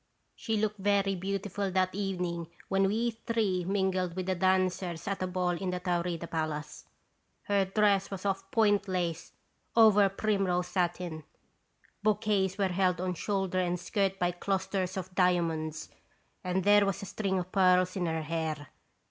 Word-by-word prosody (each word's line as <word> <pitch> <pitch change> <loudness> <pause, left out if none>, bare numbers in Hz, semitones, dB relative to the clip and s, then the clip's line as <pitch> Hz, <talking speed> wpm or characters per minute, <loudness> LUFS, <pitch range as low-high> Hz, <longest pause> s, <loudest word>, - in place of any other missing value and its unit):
She 220 -1 -2
looked 210 -1 -1
very 200 0 +2
beautiful 195 +1 -3
that 185 0 +1
evening 180 -4 -2 0.2
when 195 0 +3
we 230 +4 0
three 220 -5 -1
mingled 185 -2 0
with 185 -1 -3
the 190 - +1
dancers 185 -2 0
at 200 -1 -2
a 185 - 0
ball 180 -1 0
in 180 +2 -3
the 180 0 -2
Taurida 175 -2 -1
Palace; 155 -2 -4 0.6
her 200 -1 +2
dress 200 0 +2
was 195 0 -6
of 195 -1 -2
point 205 -3 +3
lace, 175 -3 -2 0.4
over 210 -3 +6
primrose 195 -3 0
satin; 175 -3 -2 0.8
bouquets 205 -2 +1
were 195 -2 +1
held 180 -1 +1
on 185 0 -1
shoulder 190 0 -1
and 180 -1 0
skirt 195 +2 0
by 175 -2 +1
clusters 190 0 -2
of 185 0 -5
diamonds, 165 -4 0 0.5
and 185 0 0
there 205 +1 +6
was 195 +1 -2
a - - -4
string 195 0 -2
of 180 0 -4
pearls 185 -1 +3
in 180 -3 -1
her 160 -1 -1
hair. 155 -2 -3
185 Hz, 155 wpm, -30 LUFS, 175-200 Hz, 0.8 s, over